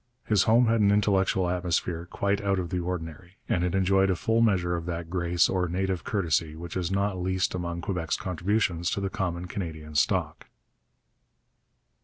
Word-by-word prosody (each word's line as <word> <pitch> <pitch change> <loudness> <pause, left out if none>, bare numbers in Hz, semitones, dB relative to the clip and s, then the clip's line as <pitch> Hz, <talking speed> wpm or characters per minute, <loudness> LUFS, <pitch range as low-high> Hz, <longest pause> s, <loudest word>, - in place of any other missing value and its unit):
His 105 -4 +3
home 115 +3 +5
had 115 -1 +2
an 100 - +5
intellectual 95 -2 +2
atmosphere 90 -1 -1
quite 100 +2 -1
out 100 -1 +1
of 90 -2 -3
the 90 - 0
ordinary, 90 +1 -6
and 90 - +1
it 90 +1 0
enjoyed 95 0 +3
a 95 - +2
full 115 +6 +1
measure 90 -6 +2
of 85 0 -5
that 85 -1 -4
grace 85 -2 +2
or 90 -1 0
native 95 +1 -2
courtesy 80 -5 0
which 85 0 -8
is 90 -2 -1
not 95 -1 -1
least 95 0 0
among 85 -1 -3
Quebec's 85 -2 -2
contributions 90 -1 0
to - - -1
the 100 -1 -2
common 90 -5 -2
Canadian 80 -5 -6
stock. 75 - 0
90 Hz, 175 wpm, -27 LUFS, 85-95 Hz, -, home